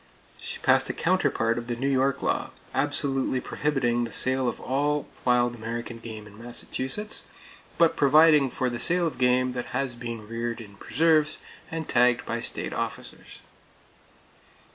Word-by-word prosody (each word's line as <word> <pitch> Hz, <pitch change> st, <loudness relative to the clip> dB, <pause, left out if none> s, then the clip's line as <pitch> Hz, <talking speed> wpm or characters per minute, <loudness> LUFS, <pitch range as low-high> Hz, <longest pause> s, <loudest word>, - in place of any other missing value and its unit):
She -, -, -5 dB
passed -, -, +3 dB
a -, -, -1 dB
counterpart 115 Hz, +1 st, +1 dB
of 120 Hz, -, -8 dB
the 120 Hz, -, -2 dB
New 130 Hz, +4 st, -2 dB
York 135 Hz, 0 st, +1 dB
law, -, -, 0 dB, 0.2 s
absolutely 140 Hz, -2 st, +1 dB
prohibiting 125 Hz, -4 st, 0 dB
the 115 Hz, -, -4 dB
sale 130 Hz, +2 st, +3 dB
of -, -, -6 dB
all 145 Hz, +2 st, 0 dB, 0.2 s
wild 120 Hz, -1 st, +3 dB
American 115 Hz, +1 st, -6 dB
game 110 Hz, -2 st, -8 dB
in 105 Hz, +2 st, -13 dB
Massachusetts, 130 Hz, -, -4 dB, 0.5 s
but 170 Hz, -1 st, +4 dB
providing 150 Hz, 0 st, +5 dB
for 130 Hz, -, -1 dB
the 120 Hz, -1 st, -3 dB
sale 175 Hz, 0 st, +2 dB
of 160 Hz, -, -3 dB
game 125 Hz, 0 st, +3 dB
that 125 Hz, -1 st, -4 dB
has 135 Hz, -3 st, -1 dB
been 115 Hz, -2 st, -7 dB
reared 115 Hz, +1 st, -3 dB
in 100 Hz, -3 st, -11 dB
preserves 155 Hz, +4 st, +2 dB, 0.3 s
and 160 Hz, 0 st, -4 dB
tagged 125 Hz, 0 st, +3 dB
by 115 Hz, -, -2 dB
state -, -, -2 dB
officers. -, -, -6 dB
125 Hz, 155 wpm, -26 LUFS, 120-140 Hz, 0.5 s, providing